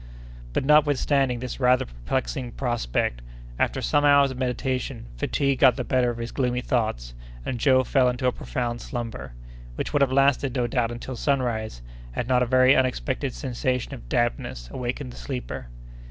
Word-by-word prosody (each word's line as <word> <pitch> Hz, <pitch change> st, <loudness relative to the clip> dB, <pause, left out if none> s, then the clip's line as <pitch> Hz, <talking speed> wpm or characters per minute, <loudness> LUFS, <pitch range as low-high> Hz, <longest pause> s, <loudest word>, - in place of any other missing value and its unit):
But, -, -, 0 dB
notwithstanding 140 Hz, -3 st, +3 dB
this 125 Hz, +1 st, -5 dB
rather 125 Hz, -1 st, +4 dB
perplexing -, -, -3 dB
prospect, 115 Hz, -, -1 dB, 0.4 s
after -, -, 0 dB
some 145 Hz, -, +2 dB
hours 140 Hz, -1 st, +5 dB
of 130 Hz, -, -7 dB
meditation, 130 Hz, -, -2 dB
fatigue 140 Hz, -, 0 dB
got 130 Hz, -2 st, +6 dB
the 125 Hz, -, -3 dB
better 125 Hz, 0 st, +2 dB
of 120 Hz, -, -4 dB
his 115 Hz, 0 st, -5 dB
gloomy 125 Hz, -2 st, 0 dB
thoughts, 85 Hz, -, -1 dB, 0.3 s
and 125 Hz, -, -3 dB
Joe 130 Hz, -1 st, +4 dB
fell 130 Hz, 0 st, +3 dB
into 125 Hz, +1 st, -3 dB
a 125 Hz, -, +4 dB
profound 120 Hz, -2 st, -3 dB
slumber, 115 Hz, -, -5 dB, 0.4 s
which -, -, -4 dB
would 145 Hz, -, +2 dB
have 135 Hz, -2 st, +3 dB
lasted 135 Hz, -1 st, +3 dB
no 125 Hz, -2 st, +1 dB
doubt 120 Hz, -1 st, 0 dB
until 120 Hz, +2 st, -6 dB
sunrise, 115 Hz, -, -1 dB, 0.3 s
had 120 Hz, -, -3 dB
not 125 Hz, -1 st, +3 dB
a 125 Hz, -, +2 dB
very 130 Hz, +1 st, +5 dB
unexpected 125 Hz, -, 0 dB
sensation 125 Hz, -, -2 dB
of 130 Hz, -, -10 dB
dampness 120 Hz, -, -1 dB
awakened 125 Hz, +1 st, -4 dB
the -, -, -12 dB
sleeper. 125 Hz, -, -5 dB
125 Hz, 170 wpm, -25 LUFS, 120-130 Hz, 0.4 s, got